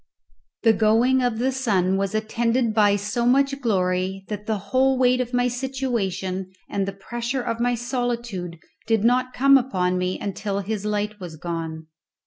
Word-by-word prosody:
The 225 -2 +6
going 225 +5 +3
of 245 -3 0
the 255 +3 +1
sun 200 -8 +1
was 195 +1 -1
attended 230 +2 0
by 205 -2 +4
so 210 +4 -1
much 275 +2 +2
glory 190 -3 0
that 210 0 -5
the 220 -1 0
whole 260 +6 +1
weight 255 0 +3
of 245 -1 -4
my 245 0 +2
situation 235 -8 -2 0.2
and 195 -1 -2
the - - -1
pressure 240 +6 -4
of 230 -1 -3
my 245 0 +1
solitude 235 -7 -3 0.3
did 225 -2 +2
not 255 +2 +2
come 275 +1 +6
upon 185 -8 0
me 180 0 -1
until 200 0 -3
his 210 +1 -4
light 210 0 -2
was 175 -4 -7
gone. 160 -1 -5
220 Hz, 165 wpm, -23 LUFS, 195-245 Hz, 0.3 s, The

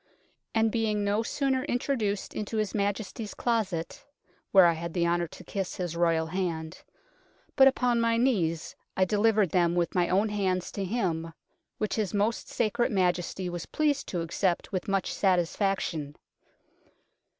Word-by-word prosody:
" - - -27
And 225 0 +3
being 215 -2 0
no 205 +2 +1
sooner 265 +2 0
introduced 245 -7 -1
into 215 +1 -4
his 215 -2 -1
Majesty's 205 +1 -2
closet 205 -9 -1 0.5
(where 190 -2 +8
I 170 - +5
had 170 +1 -6
the 170 -1 +2
honour 170 0 +1
to - - -12
kiss 195 -2 -4
his 175 -2 -3
Royal 165 -1 +2
hand) 165 -1 -3 0.7
but 270 -1 +8
upon 250 -3 +2
my 230 0 +2
knees 180 -11 0 0.2
I 190 - +4
de 205 +3 0
livered 215 -5 +3
them 175 -1 +2
with 175 -1 0
my 175 -2 +2
own 200 +4 +2
hands 190 -3 -1
to 200 - -3
him, 170 -6 -2 0.4
which 215 +1 -2
his 210 -3 -1
Most 210 +3 0
Sacred 240 +2 0
Majesty 180 -1 0
was 175 -2 -5
pleased 295 -2 0
to 175 - -2
accept 170 +2 -1
with 190 +2 -3
much 195 -2 0
satisfaction." 180 -5 0
195 Hz, 160 wpm, -28 LUFS, 175-220 Hz, 0.7 s, where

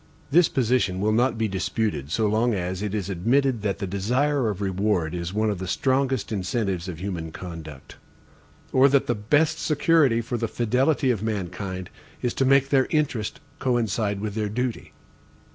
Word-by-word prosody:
This 170 +2 +5
position 120 -7 +1
will 105 +2 +1
not 120 +2 +2
be 110 -1 +1
disputed 95 - -2
so 110 +7 +1
long 110 +2 +2
as 90 0 -3
it 105 0 -2
is 100 -4 -2
admitted 120 +6 +1
that 100 -2 -1
the - - -3
desire 125 +7 0
of 100 -3 -4
reward 95 -4 0
is 85 0 -3
one 110 +1 +1
of 100 - -4
the 95 - -5
strongest 130 -1 0
incentives 95 -2 -2
of 90 -3 -5
human 85 -4 -4
conduct; 80 -5 -9 0.8
or 135 +2 +6
that 140 0 +3
the 120 - +1
best 145 +9 +1
security 150 -5 +3
for 120 +1 -3
the 115 - -1
fidelity 130 +5 +1
of 110 -5 -2
mankind 95 -3 -4 0.3
is 125 - -1
to 135 - +1
make 135 0 +4
their 135 -2 +3
interests 140 -9 -1 0.2
coincide 110 -5 0
with 105 -1 -3
their 105 -1 -2
duty. 125 +2 -3
110 Hz, 175 wpm, -25 LUFS, 95-130 Hz, 0.8 s, or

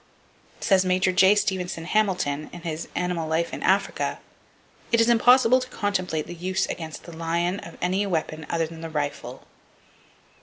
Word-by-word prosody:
Says 195 -4 +3
Major 185 +1 +2
J. 190 +2 +5
Stevenson 180 -4 -1
Hamilton 180 -8 0
in 175 - -9
his 165 -1 -4
"Animal 175 -3 -2
Life 165 +1 0
in - - -5
Africa:" - - +1 0.7
"It 230 - +4
is 230 +1 +4
impossible 245 +1 +5
to 255 0 -7
contemplate 185 -9 -2
the - - -8
use 185 +2 -1
against 160 -3 -6
the 170 - -11
lion 170 +3 -1
of 170 - -11
any 185 +3 +1
other 200 - -3
weapon 155 -2 -3
than 165 -1 -2
the 165 - -5
rifle." 145 -4 -4
180 Hz, 160 wpm, -25 LUFS, 165-195 Hz, 0.7 s, J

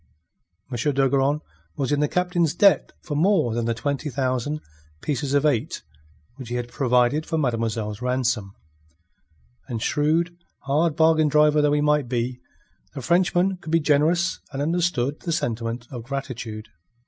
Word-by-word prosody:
M. 120 - -3 0.2
d'Ogeron 135 +2 +2 0.4
was 135 0 -1
in 145 - +2
the 150 - +2
Captain's 175 -2 0
debt 200 0 +4
for 155 - -5
more 155 - +2
than 120 0 -1
the 115 0 0
twenty 140 +4 -2
thousand 130 +3 -1 0.4
pieces 140 -1 -1
of 145 +1 +3
eight 135 -7 0 0.5
which 130 -4 -8
he 120 - -3
had 120 0 -3
provided 125 +3 +2
for 165 - -1
mademoiselle's 115 -5 -1
ransom; 125 -5 -1 1.1
and 120 -4 -3
shrewd, 160 +4 +1 0.3
hard 150 +3 +1
bargain 160 -1 +4
driver 150 0 +4
though 145 0 +3
he 150 - +2
might 150 -4 +2
be, 125 0 -2 0.6
the - - -5
Frenchman 180 +4 +2
could 160 -3 -8
be 165 - +4
generous 160 +4 +2
and 135 - -5
understood 150 -3 0
the 170 - -4
sentiment 115 -4 -2
of 125 -3 -6
gratitude. 120 -4 -6
140 Hz, 150 wpm, -24 LUFS, 125-155 Hz, 1.1 s, debt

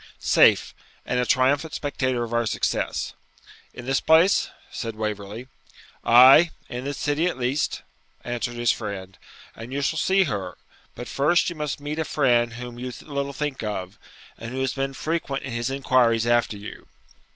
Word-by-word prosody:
'Safe, - - +4 0.3
and 125 - -1
a 125 - 0
triumphant 140 +4 +2
spectator 130 -4 -1
of 120 0 -6
our 120 -1 +1
success.' - - -1 0.6
'In 125 - -10
this 135 +1 +1
place?' 165 +5 +4 0.2
said 115 -2 -5
Waverley. 105 +2 -5 0.6
'Ay, 130 +8 +8 0.2
in 125 +2 -5
this 140 0 -4
city 150 +4 0
at 175 - -2
least,' 130 +4 -1 0.4
answered 120 0 -3
his 120 0 +2
friend, 95 -3 -6 0.4
'and 115 +3 -9
you 140 +1 -2
shall 160 +3 0
see 190 +2 +3
her; 100 - -4 0.4
but 120 - -7
first 170 +6 +2
you - - -7
must 150 -2 -3
meet 145 +2 -5
a - - +1
friend 120 -6 +2
whom 120 0 -8
you 125 +1 -5
little 140 -1 -4
think 145 0 -4
of, 100 -3 -5 0.4
who 120 +3 -5
has 130 -1 0
been 135 0 -3
frequent 155 -4 -3
in 135 - -6
his 120 +1 -2
inquiries 125 -4 +2
after 120 -3 +1
you.' 100 +1 -10
130 Hz, 165 wpm, -24 LUFS, 115-145 Hz, 0.6 s, Ay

